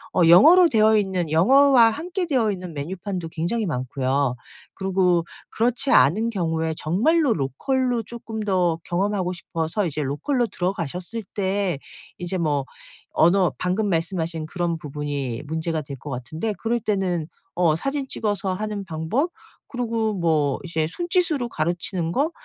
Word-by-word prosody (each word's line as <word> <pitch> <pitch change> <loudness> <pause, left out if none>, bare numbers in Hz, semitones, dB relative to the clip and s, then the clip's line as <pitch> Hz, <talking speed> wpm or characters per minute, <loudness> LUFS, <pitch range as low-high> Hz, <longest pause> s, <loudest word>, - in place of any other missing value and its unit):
어 185 - +3
영어로 320 - +8
되어 220 -3 +4
있는, 185 -6 -1
영어와 255 - +6
함께 350 - -3
되어 245 -8 +2
있는 180 -4 -6
메뉴판도 175 +3 -4
굉장히 175 +9 -2
많고요. 130 -1 -1 0.4
그러고 185 -3 +1 0.2
그렇지 245 +4 0
않은 175 - +4
경우에 160 -5 -1
정말로 250 - +2
로컬로 240 - -1
조금 225 0 -7
더 180 -5 +1
경험하고 185 0 -1
싶어서 165 +3 -2
이제 150 0 -3
로컬로 160 - 0
들어가셨을 180 +3 -3
때 190 -5 0 0.4
이제 180 +1 -3
뭐 145 -5 0 0.5
언어, 175 +1 +4
방금 195 +4 0
말씀하신 165 -2 -2
그런 170 0 -2
부분이 145 -4 -4
문제가 160 0 -2
될 140 -1 -8
것 145 - -9
같은데 155 - -3
그럴 235 +1 0
때는 185 -7 -1 0.3
어 170 -3 +3
사진 275 - -2
찍어서 205 -6 -2
하는 210 0 -4
방법, 170 - -1 0.4
그러고 230 -3 -1
뭐 155 -6 +1
이제 160 -2 -1
손짓으로 335 - 0
가르치는 170 0 -2
거, 295 - +1
180 Hz, 315 characters per minute, -23 LUFS, 160-225 Hz, 0.5 s, 영어로